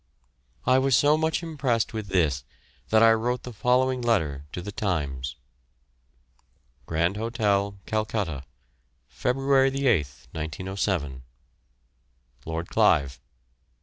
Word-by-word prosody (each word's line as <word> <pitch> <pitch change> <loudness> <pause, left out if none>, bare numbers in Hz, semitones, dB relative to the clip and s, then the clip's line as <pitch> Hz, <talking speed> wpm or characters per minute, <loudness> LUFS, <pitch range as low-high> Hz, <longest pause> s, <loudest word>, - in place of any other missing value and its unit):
I 130 +1 +5
was 135 -1 +3
so 145 +2 +4
much 160 +2 0
impressed 135 -10 -1
with 110 -2 -4
this 80 -9 +1 0.5
that 110 0 +5
I 115 - +8
wrote 120 +3 0
the 125 - -8
following 125 +4 +2
letter 80 - 0
to - - -5
The 100 +4 -6
Times: 70 -10 -2 1.5
Grand 85 +4 0
Hotel, 105 -3 0
Calcutta, 105 -10 -2 0.7
Feb. 125 - 0
8th, 135 - +2
1907. 80 -3 -3 1.3
LORD 80 +1 -3
CLIVE. 70 -3 +3
105 Hz, 105 wpm, -26 LUFS, 80-125 Hz, 1.5 s, I